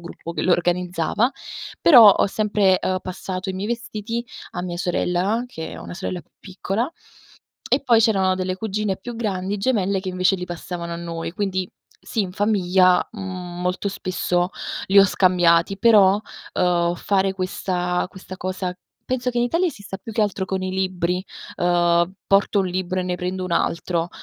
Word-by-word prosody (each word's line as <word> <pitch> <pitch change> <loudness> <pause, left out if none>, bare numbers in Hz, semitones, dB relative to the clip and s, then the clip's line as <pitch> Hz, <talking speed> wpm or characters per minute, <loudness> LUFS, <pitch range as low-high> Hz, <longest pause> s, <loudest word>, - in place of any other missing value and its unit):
gruppo 170 0 -8
che - - -2
lo 180 - +3
organizzava, 180 +6 +1 0.5
però 235 -10 +9
ho - - +2
sempre 200 -2 +2
uhm, 185 0 0
passato 185 +1 -5
i 185 - -5
miei 195 +2 -3
vestiti 235 -1 -4 0.3
a 175 - -4
mia 175 -1 -4
sorella, 180 +5 0
che 160 -10 -7
ho - - -9
una - - -8
sorella 185 -1 -4
più - - -28
piccola; 200 +5 -3 0.8
e 270 - +2
poi 235 -4 +4
c'erano 195 -4 +3
delle 185 0 -2
cugine 210 -2 -2
più 235 +4 -7
grandi 200 -3 -2
gemelle 200 -4 +1
che 185 -1 -4
invece 185 +1 +2
li 180 - -5
passavano 170 0 -6
a - - -3
noi. 170 -1 -5
Quindi 185 -2 -2 0.3
sì, 220 - -3
in 180 -2 -5
famiglia, 185 -3 +3
mhmm, 180 -4 -6
molto 180 +2 -1
spesso 180 -2 -1 0.4
li 200 +1 +6
ho 195 - +9
scambiati; 180 0 +3
però, 205 -3 +5 0.3
uhm, 175 -1 +2
fare 195 0 +1
questa 180 -1 -1
questa 190 0 -10
cosa 185 0 -3 0.3
penso 255 0 -1
che 240 - -8
in 240 - +3
Italia 335 +9 +1
esista 205 - -6
più 220 +3 -9
che 220 - +2
altro 200 -2 -1
con 190 0 -2
i 185 - -2
libri: 185 -1 -1 0.3
uhm, 175 0 +2
porto 200 +1 +3
un 190 - 0
libro 185 0 -2
e - - -2
ne 180 - -1
prendo 185 +1 -3
un 180 - -4
altro. 170 0 0
185 Hz, 175 wpm, -22 LUFS, 180-205 Hz, 0.8 s, però